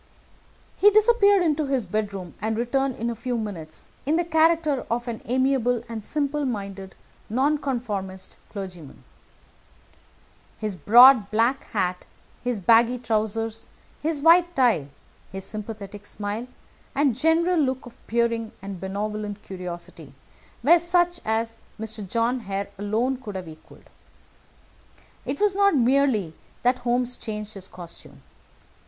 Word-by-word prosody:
He 410 - +7
disappeared 415 -2 +5
into 305 -3 +1
his 265 -5 0
bedroom, 200 -2 -3
and 220 0 -1
returned 260 +2 0
in 235 +1 -2
a - - -5
few 240 +2 -3
minutes 185 -8 -7
in 300 +3 +1
the 345 +1 +1
character 320 -3 +2
of 240 +1 -1
an 230 -2 -4
amiable 250 -1 +1
and 225 -2 -6
simple 295 +3 -1
minded 195 -6 -5 0.3
Nonconformist 235 -8 -1
clergyman. 180 -8 -8 1.5
His 215 -3 -3
broad 240 +2 +7
black 230 +5 +1
hat, 180 -3 -2 0.4
his 245 -3 -1
baggy 230 +5 +4
trousers, 225 -1 -2 0.3
his 310 -1 -1
white 345 +2 +5
tie, 235 - +3 0.4
his 195 0 -6
sympathetic 205 -1 -7
smile, 210 +4 -4 0.5
and 275 -4 +2
general 330 +5 +2
look 260 -3 0
of 240 - -12
peering 230 -1 0
and 195 -1 -7
benevolent 205 +1 -4
curiosity 180 -2 -8 0.5
were 335 +6 +7
such 350 0 +1
as 225 +1 -1 0.2
Mr. 220 -2 -4
John 235 +4 +1
Hare 200 -2 -4
alone 225 +6 0
could 215 -6 -8
have 185 -2 -5
equalled. 155 0 -14 1.4
It - - -2
was 410 -2 +2
not 400 -3 +4
merely 250 - +2 0.3
that 250 +1 +3
Holmes 245 0 0
changed 210 -1 -6
his 195 -1 -8
costume. 175 -3 -11
230 Hz, 130 wpm, -25 LUFS, 205-275 Hz, 1.5 s, He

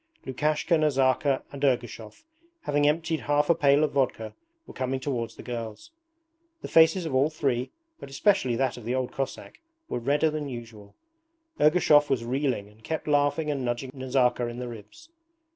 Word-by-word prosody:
Lukashka, 150 +5 0
Nazarka, 135 -2 +2
and 140 0 -8
Ergushov, 120 -5 -2 0.4
having 145 - +1
emptied 160 +1 0
half 145 +2 +2
a - - +6
pail 145 -2 +3
of 155 - +1
vodka, 125 -5 -1 0.3
were - - -12
coming 130 0 -2
towards 125 -4 -3
the - - -11
girls. 115 - -7 0.7
The - - -4
faces 165 +2 +4
of 160 - -4
all 135 +3 +3
three, 135 -5 -1 0.3
but - - -10
especially 135 - +2
that 130 +1 -1
of 120 - -10
the 120 +2 -1
old 130 -1 -2
Cossack, 135 -1 -5 0.3
were - - -3
redder 145 +6 +1
than 150 -2 -4
usual. 115 -5 -10 0.6
Ergushov 150 -2 +4
was 125 -4 0
reeling 125 -4 -1
and 105 +2 -21
kept 160 +4 -4
laughing 145 +1 +1
and 140 -3 -3
nudging 120 +2 -3
Nazarka 130 -2 +1
in 120 0 -6
the 125 0 -5
ribs. 115 - -12
135 Hz, 170 wpm, -26 LUFS, 120-150 Hz, 0.7 s, a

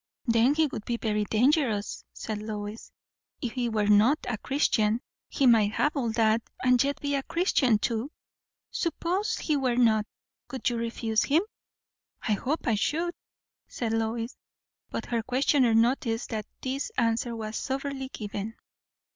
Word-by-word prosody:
"Then 235 +3 +4
he 320 0 +4
would 260 -7 -5
be 235 +1 -2
very 210 -2 0
dangerous," 230 -2 +1
said 215 -1 -5
Lois, 210 0 -6 0.5
"if 245 - -3
he 245 -1 -1
were 215 -2 +1
not 210 +8 +5
a 225 -4 -2
Christian. 230 -5 +1 0.3
He 275 - +1
might 220 -4 +5
have 295 +7 +1
all 240 -5 0
that, 225 0 +3 0.2
and 250 -1 +5
yet 280 +1 -1
be 285 0 -2
a 275 - +1
Christian 270 - +2
too." 230 +6 -2 0.6
"Suppose 370 -2 -1
he 305 - 0
were 260 -4 +1
not; 220 -3 +3 0.4
would 265 - -3
you 240 - -2
refuse 230 -1 0
him?" 315 +6 +3 0.8
"I 220 - -1
hope 275 +10 -2
I 230 - +2
should," 325 +11 0 0.5
said 225 -2 -3
Lois. 225 +1 -1 0.5
But - - -4
her 235 -1 -1
questioner 255 0 +2
noticed 230 0 +1
that 215 -2 -3 0.2
this 270 +2 -2
answer 230 0 +1
was 220 -1 -5
soberly 270 +1 -3
given. 210 -1 -5
235 Hz, 155 wpm, -28 LUFS, 220-275 Hz, 0.8 s, not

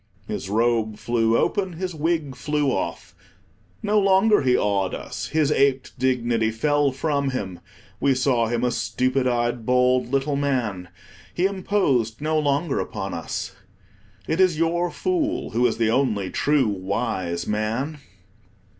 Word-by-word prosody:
His 95 - -4
robe 110 0 +1
flew 115 0 +1
open, 190 -3 0
his 180 +2 -4
wig 155 -3 -1
flew 145 +2 0
off. 95 - -4 0.7
No 210 0 +3
longer 195 +2 +4
he 125 -2 +3
awed 100 -2 0
us. - - -6
His 155 -2 +1
aped 135 -2 +2
dignity 120 -3 +1
fell 145 +5 +1
from 140 0 -1
him; 95 -9 -4 0.4
we 140 -1 +2
saw 125 -3 +2
him 120 +1 -1
a 125 - +2
stupid 130 +2 0
eyed, 120 -1 0
bald 125 +1 +2
little 140 +1 0
man; 120 -11 -1 0.5
he 180 - +1
imposed 185 - 0
no 155 +1 0
longer 145 +1 0
upon - - -4
us. - - -4 0.8
It 160 - -1
is 180 -4 +3
your 170 +2 +1
fool 350 - -1
who 125 +1 +3
is 115 - -2
the 115 -1 +2
only 110 -7 0
true 145 -4 +2
wise 95 -3 -2
man. 115 +8 -2
130 Hz, 145 wpm, -23 LUFS, 115-155 Hz, 0.8 s, longer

